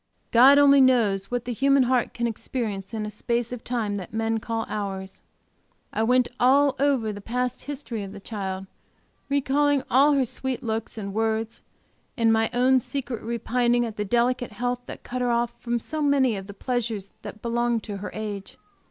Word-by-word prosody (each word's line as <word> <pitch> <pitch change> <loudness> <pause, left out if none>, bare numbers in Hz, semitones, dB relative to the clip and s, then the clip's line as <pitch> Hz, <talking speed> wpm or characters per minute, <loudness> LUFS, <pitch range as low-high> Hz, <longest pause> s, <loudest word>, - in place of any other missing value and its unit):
God 260 +4 +8
only 280 -1 +7
knows 215 -7 +3
what 245 -1 -2
the 245 - -2
human 275 +3 +4
heart 250 -1 +1
can 235 - -1
experience 215 -4 -3
in 220 -2 -3
a 210 - -5
space 235 +3 -1
of 245 - -7
time 220 -4 -2
that 185 - -7
men 225 0 0
call 225 0 -3
hours. 195 -2 -5 0.7
I - - 0
went 250 +2 +3
over 275 +2 +4 0.3
all - - -1
the 205 - -8
past 250 +3 -3
history 275 -6 -5
of 195 -1 -6
the 200 - -9
child, 195 -2 -5 0.6
recalling 280 0 +2
all 280 +4 +5
her 275 -2 +2
sweet 260 +1 -4
looks 225 -1 -3
and 200 -2 -5
words, 220 +1 -1 0.6
and 225 -2 +4
my 225 0 +2
own 255 +2 +4
secret 255 -2 -5
repining 240 +1 +1
at 225 -2 -6
the 210 - -1
delicate 240 +2 0
health 245 +2 -2
that - - -9
cut 250 +1 -4
her 245 - +1
off 235 0 +1
from 240 0 -1
so 310 +6 -5
many 275 -5 +3
of 195 -1 -7
the 200 - -9
pleasures 225 -4 -3
that 215 - -9
belong 235 0 +1
to 205 -2 -6
her 200 - -6
age. 205 -2 -6
235 Hz, 185 wpm, -25 LUFS, 215-255 Hz, 0.7 s, God